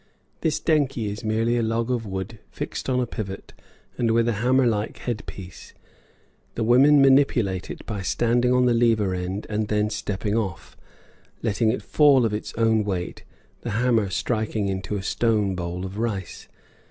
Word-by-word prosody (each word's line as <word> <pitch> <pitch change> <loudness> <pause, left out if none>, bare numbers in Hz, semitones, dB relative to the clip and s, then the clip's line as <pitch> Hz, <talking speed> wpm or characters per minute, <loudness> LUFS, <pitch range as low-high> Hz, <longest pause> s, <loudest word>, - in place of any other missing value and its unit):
This 155 -1 0
denkhi 135 -9 +1
is 105 +3 -7
merely 115 +2 +1
a - - +1
log 115 +2 -1
of 115 -3 -2
wood 95 +3 -5
fixed - - -5
on 125 -1 +1
a 125 - +1
pivot 100 -4 -7 0.5
and 115 - +2
with 115 +1 +2
a 120 - +2
hammer 130 +2 +3
like 110 -1 -1
head 120 -2 -4
piece. 90 -3 -10 0.8
The 115 - -1
women 135 +5 +6
manipulate 125 -9 +3
it - - -8
by 105 -3 -4
standing 120 +5 +1
on 125 0 +4
the 120 - +3
lever 115 -5 +2
end 90 +3 -4
and 105 0 -2
then 105 0 0
stepping 105 -1 -3
off, 95 -7 -3 0.7
letting 110 0 +1
it 125 - -4
fall 140 -5 +4
of 110 - -1
its 105 - -4
own 110 -1 +2
weight, 95 -3 -4 0.4
the 120 - -5
hammer 115 -4 +2
striking 110 0 -1
into 95 +1 -3
a 95 - -4
stone 105 -4 +1
bowl 90 0 -4
of 95 +3 -6
rice. 100 -7 -4
110 Hz, 175 wpm, -24 LUFS, 100-120 Hz, 0.8 s, women